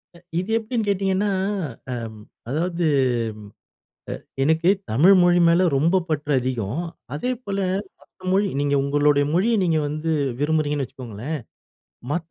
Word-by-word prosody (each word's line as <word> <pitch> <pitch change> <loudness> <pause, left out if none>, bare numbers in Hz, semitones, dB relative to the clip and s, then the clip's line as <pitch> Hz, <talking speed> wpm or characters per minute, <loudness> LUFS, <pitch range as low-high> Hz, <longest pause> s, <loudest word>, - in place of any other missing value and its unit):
அ - - -13 0.2
இது 185 +4 -4
எப்டின்னு 225 0 -2
கேட்டிங்கன்னா, 195 +1 +1 0.6
அம் 115 -3 -6 0.3
அதாவது 170 +4 -1 1.4
அ - - -24 0.2
எனக்கு 160 +4 +3 0.2
தமிழ் 165 - +6
மொழி 175 0 +4
மேல 175 +2 +4
ரொம்ப 170 +6 +3
பற்று 150 -1 -1
அதிகம். 125 - -2 0.3
அதேபோல 215 - -3 0.4
மற்ற - - -26
மொழி 200 +1 +3
நீங்க 145 0 +1
உங்களுடைய 145 0 +3
மொழிய 205 +7 +2
நீங்க 165 -3 +2
வந்து 155 +2 -2 0.3
விரும்புறீங்கன்னு 150 -2 +1
வச்சுக்கோங்களேன், 130 +3 -6 0.7
மத்த 170 0 -3
160 Hz, 120 wpm, -23 LUFS, 145-185 Hz, 1.4 s, தமிழ்